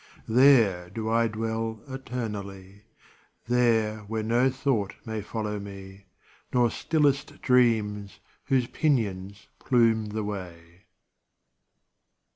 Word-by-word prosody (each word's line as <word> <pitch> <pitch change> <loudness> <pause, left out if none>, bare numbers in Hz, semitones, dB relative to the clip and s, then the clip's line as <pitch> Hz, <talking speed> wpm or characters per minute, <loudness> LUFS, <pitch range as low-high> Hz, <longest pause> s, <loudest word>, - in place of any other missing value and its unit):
There 115 -8 +4
do 110 +3 -4
I 115 0 +3
dwell 110 0 -3
eternally. 105 -7 -7 0.6
There 115 -3 +2
where 110 +1 -4
no 120 +4 +2
thought 130 -6 -1
may 110 -1 -4
follow 105 0 -4
me, 100 -1 -10 0.4
Nor 120 -2 +3
stillest 145 -3 0
dreams 110 -6 +2 0.3
whose 130 -2 +2
pinions 105 -9 -1
plume 115 -3 +2
the 105 +1 -3
way. 90 -2 -8
110 Hz, 95 wpm, -26 LUFS, 100-120 Hz, 0.6 s, There